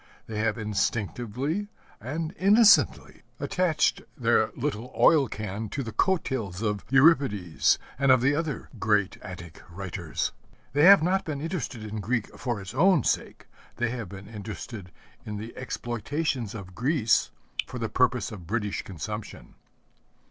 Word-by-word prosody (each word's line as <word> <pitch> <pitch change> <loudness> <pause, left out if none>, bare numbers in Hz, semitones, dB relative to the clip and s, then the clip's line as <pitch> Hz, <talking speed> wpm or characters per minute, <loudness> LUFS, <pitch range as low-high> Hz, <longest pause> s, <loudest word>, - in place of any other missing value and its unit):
They 110 -1 -5
have 115 +1 0
instinctively 120 - -2 0.3
and 155 - -4
innocently 210 +3 +5 0.2
attached 170 -5 +1 0.2
their - - +3
little 115 +4 -3
oil 150 -5 +5
can 105 0 -5
to 140 - -3
the 115 - -6
coattails 115 - 0
of 105 -2 -1
Euripides 130 - +4 0.2
and 140 -1 +4
of 130 - +6
the 135 +3 +3
other 150 -1 -3
great 105 -3 +1
Attic 85 -3 -9
writers. 90 -2 -3 0.4
They 145 +3 +5
have 195 -3 +9
not 190 +3 +2
been 155 -5 -4
interested 140 - -4
in 110 0 -5
Greek 110 +2 -2
for 120 -5 -3
its 95 +1 -8
own 165 - +4
sake. - - -1 0.3
They 120 -1 -1
have 120 -6 -5
been 100 0 -10
interested 105 -2 -8 0.3
in 105 -1 -5
the 110 +3 -7
exploitations 120 0 -3
of 95 -4 -8
Greece 120 - +2 0.4
for - - -7
the - - -2
purpose - - +1
of 90 -6 -9
British 105 0 -1
consumption. 105 +4 -7
115 Hz, 140 wpm, -27 LUFS, 105-145 Hz, 0.4 s, have